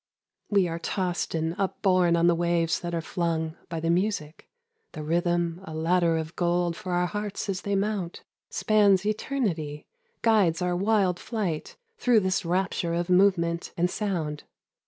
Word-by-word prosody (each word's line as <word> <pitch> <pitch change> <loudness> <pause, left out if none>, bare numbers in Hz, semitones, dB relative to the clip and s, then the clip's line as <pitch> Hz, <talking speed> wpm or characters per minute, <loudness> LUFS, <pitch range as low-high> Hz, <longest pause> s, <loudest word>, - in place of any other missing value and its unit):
We 200 -3 +3
are 165 0 -4
tossed 180 -1 -2
and 160 0 -1
upborne 185 -3 +2
on 170 0 +3
the 175 - +5
waves 170 -1 +1
that 175 -1 -4
are 165 - -1
flung 160 -2 -2
By 165 - -3
the 165 +1 0
music, 175 -4 -2 0.4
The 155 - -6
rhythm, 175 +1 0
a 160 -3 -8
ladder 165 +1 +2
of 160 +1 -5
gold 175 -1 +1
for 185 -1 -5
our 175 0 +2
hearts 205 +2 -4
as 190 -1 -2
they 200 0 -1
mount, 195 -3 -2 0.3
Spans 205 -3 +3
eternity, 205 - -2 0.4
Guides 200 -8 +3
our 180 -1 0
wild 195 -2 +2
flight 195 -10 -3 0.2
Through 240 - +4
this 190 0 0
rapture 175 -1 0
of 175 +1 -1
movement 180 -3 +2
and 175 +1 +1
sound. 165 -8 -2
175 Hz, 155 wpm, -27 LUFS, 165-195 Hz, 0.4 s, the